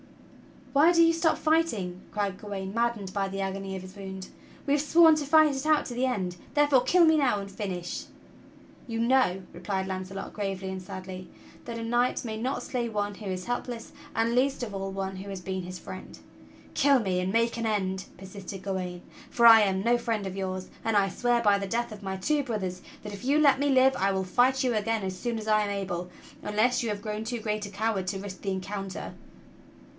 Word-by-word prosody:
"Why 310 Hz, +5 st, +6 dB
do 335 Hz, -1 st, +6 dB
you 330 Hz, 0 st, +5 dB
stop 330 Hz, -1 st, +2 dB
fighting.?" 225 Hz, -, 0 dB
cried 200 Hz, -3 st, -2 dB
Gawain, 195 Hz, -2 st, -5 dB
maddened 230 Hz, -4 st, -1 dB
by 195 Hz, -1 st, 0 dB
the 195 Hz, 0 st, -4 dB
agony 195 Hz, 0 st, -3 dB
of 190 Hz, -, -5 dB
his 185 Hz, +1 st, -11 dB
wound. 190 Hz, -1 st, -7 dB, 0.4 s
"We 280 Hz, -, +2 dB
have 290 Hz, -, +3 dB
sworn 320 Hz, +1 st, +6 dB
to 295 Hz, -, -2 dB
fight 310 Hz, 0 st, +5 dB
it 270 Hz, +2 st, -4 dB
out 310 Hz, -1 st, +3 dB
to 245 Hz, -, -5 dB
the 250 Hz, +2 st, 0 dB
end, 185 Hz, -8 st, -2 dB, 0.2 s
therefore 290 Hz, -3 st, +5 dB
kill 350 Hz, +7 st, +5 dB
me 320 Hz, -1 st, +5 dB
now 255 Hz, -8 st, +2 dB
and 195 Hz, 0 st, -7 dB
finish." 185 Hz, -3 st, -4 dB, 0.8 s
"You 225 Hz, -1 st, -3 dB
know," 235 Hz, -7 st, +3 dB
replied 190 Hz, +2 st, -2 dB
Launcelot 190 Hz, +1 st, -5 dB
gravely 195 Hz, -2 st, -3 dB
and 190 Hz, 0 st, -5 dB
sadly, 185 Hz, 0 st, -8 dB, 0.4 s
"that 235 Hz, -1 st, -5 dB
a 230 Hz, -, -4 dB
knight 240 Hz, +2 st, +1 dB
may 220 Hz, -1 st, -4 dB
not 250 Hz, +4 st, -2 dB
slay 245 Hz, -2 st, -2 dB
one 205 Hz, -2 st, -2 dB
who 210 Hz, -, -10 dB
is 185 Hz, -1 st, -3 dB
helpless 245 Hz, 0 st, -4 dB, 0.2 s
and 225 Hz, +1 st, +1 dB
least 260 Hz, +1 st, +1 dB
of 215 Hz, -4 st, -5 dB
all 195 Hz, 0 st, -3 dB
one 190 Hz, 0 st, -4 dB
who 195 Hz, +2 st, -7 dB
has 195 Hz, -2 st, -5 dB
been 190 Hz, 0 st, -4 dB
his 180 Hz, +1 st, -7 dB
friend." -, -, -9 dB, 0.6 s
"Kill 280 Hz, -2 st, +4 dB
me 190 Hz, -5 st, 0 dB
and 180 Hz, +1 st, -1 dB
make 230 Hz, +1 st, +2 dB
an 230 Hz, -, -2 dB
end!" 190 Hz, -3 st, -1 dB
persisted 190 Hz, 0 st, -8 dB
Gawain, 185 Hz, -2 st, -3 dB, 0.3 s
"for 235 Hz, -, +2 dB
I 225 Hz, -1 st, +10 dB
am 190 Hz, -2 st, +1 dB
no 240 Hz, +2 st, +4 dB
friend 225 Hz, -4 st, -2 dB
of 190 Hz, 0 st, -5 dB
yours; 185 Hz, -1 st, -3 dB, 0.2 s
and 225 Hz, -1 st, +1 dB
I 195 Hz, -1 st, +3 dB
swear 240 Hz, +4 st, +1 dB
by 205 Hz, -2 st, +4 dB
the 195 Hz, -, -3 dB
death 235 Hz, +3 st, -1 dB
of 210 Hz, -1 st, -9 dB
my 190 Hz, -1 st, -3 dB
two 290 Hz, +10 st, +1 dB
brothers 190 Hz, -7 st, -3 dB, 0.2 s
that 210 Hz, -1 st, -6 dB
if 200 Hz, -, -9 dB
you 280 Hz, +3 st, +3 dB
let 285 Hz, -3 st, +5 dB
me 285 Hz, 0 st, +2 dB
live 265 Hz, 0 st, +5 dB
I 195 Hz, +1 st, +2 dB
will 190 Hz, 0 st, 0 dB
fight 250 Hz, +8 st, +2 dB
you 250 Hz, -2 st, +1 dB
again 220 Hz, 0 st, 0 dB
as 185 Hz, -1 st, -4 dB
soon 235 Hz, +3 st, -2 dB
as 220 Hz, 0 st, -6 dB
I 215 Hz, 0 st, +4 dB
am 205 Hz, -, -1 dB
able, 185 Hz, -3 st, -3 dB, 0.3 s
unless 215 Hz, +4 st, +1 dB
you 235 Hz, -, -2 dB
have 205 Hz, -1 st, -4 dB
grown 215 Hz, 0 st, -3 dB
too 235 Hz, +1 st, -3 dB
great 215 Hz, -1 st, -2 dB
a -, -, -7 dB
coward 200 Hz, -1 st, -1 dB
to 195 Hz, +1 st, -2 dB
risk 195 Hz, -1 st, -8 dB
the 200 Hz, -, -3 dB
encounter!" 195 Hz, 0 st, -5 dB
210 Hz, 220 wpm, -28 LUFS, 190-245 Hz, 0.8 s, I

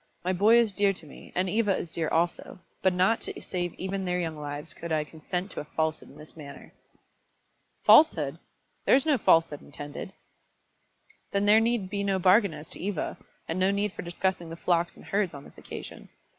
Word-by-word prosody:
My 185 Hz, -, +1 dB
boy 210 Hz, +6 st, +5 dB
is 235 Hz, -3 st, +3 dB
dear 200 Hz, 0 st, +3 dB
to 180 Hz, -, -7 dB
me, 145 Hz, -, -13 dB
and 185 Hz, +1 st, +1 dB
Eva 205 Hz, 0 st, +1 dB
is 165 Hz, -, -5 dB
dear 165 Hz, -2 st, 0 dB
also, 170 Hz, +1 st, -1 dB, 0.2 s
but 190 Hz, -, +4 dB
not 185 Hz, +5 st, +2 dB
to -, -, -6 dB
save 175 Hz, -2 st, -4 dB
even 190 Hz, +1 st, -3 dB
their 180 Hz, -1 st, -1 dB
young 165 Hz, -2 st, -2 dB
lives 145 Hz, +1 st, -5 dB
could 170 Hz, 0 st, -7 dB
I 155 Hz, -1 st, +2 dB
consent 175 Hz, +5 st, -5 dB
to -, -, -6 dB
a -, -, -4 dB
falsehood 160 Hz, +1 st, -2 dB
in -, -, -15 dB
this 150 Hz, -, -13 dB
matter." 145 Hz, -3 st, -11 dB, 1.1 s
"Falsehood! 160 Hz, -, +5 dB, 0.5 s
There -, -, +7 dB
is 270 Hz, -, +3 dB
no 295 Hz, -5 st, +3 dB
falsehood 165 Hz, -6 st, +3 dB
intended." 145 Hz, +6 st, -8 dB, 1.2 s
"Then 200 Hz, 0 st, +1 dB
there 210 Hz, +2 st, +7 dB
need 225 Hz, -4 st, 0 dB
be 200 Hz, -1 st, -1 dB
no 195 Hz, -1 st, +1 dB
bargain 190 Hz, -1 st, +4 dB
as 155 Hz, -, -10 dB
to -, -, -6 dB
Eva, 195 Hz, -3 st, -3 dB, 0.3 s
and 165 Hz, +3 st, -2 dB
no 185 Hz, +1 st, +3 dB
need 200 Hz, 0 st, 0 dB
for -, -, -6 dB
discussing 175 Hz, 0 st, -2 dB
the 165 Hz, -, -6 dB
flocks 170 Hz, 0 st, 0 dB
and -, -, -14 dB
herds 195 Hz, -5 st, 0 dB
on 140 Hz, -, -9 dB
this -, -, -15 dB
occasion. -, -, -9 dB
180 Hz, 200 wpm, -28 LUFS, 160-200 Hz, 1.2 s, There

